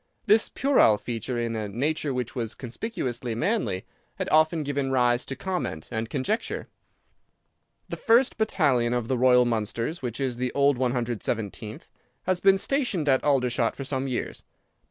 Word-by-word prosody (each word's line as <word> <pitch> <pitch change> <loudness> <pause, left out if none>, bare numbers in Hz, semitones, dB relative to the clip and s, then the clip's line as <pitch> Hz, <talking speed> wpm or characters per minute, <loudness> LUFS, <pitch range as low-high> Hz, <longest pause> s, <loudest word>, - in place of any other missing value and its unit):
This 215 +1 +4
puerile 265 - +4
feature 120 +2 -4
in 115 -1 -2
a 105 -2 -3
nature 145 +7 -1
which 125 -3 -3
was 115 -3 -4
conspicuously 125 - -4
manly 185 - -1 0.3
had - - -3
often 155 +1 +4
given 140 -1 -1
rise 125 -2 +2
to 135 - -4
comment 180 - -4
and 110 -1 -3
conjecture. 150 - -2 1.2
"The - - -5
first 240 +2 +3
battalion 135 - +2
of 120 -2 -2
the 130 - +2
Royal 125 -1 +5
Mallows 115 - -2
(which 120 -3 -4
is 130 -3 -1
the 125 0 -1
old 140 -2 +3
117th) 115 -4 -2 0.4
has 185 -1 0
been 195 0 +5
stationed 210 - -1
at 135 -2 +3
Aldershot 125 -4 +1
for 135 - -5
some 135 -1 -2
years. 125 -2 -3
130 Hz, 155 wpm, -26 LUFS, 120-155 Hz, 1.2 s, Royal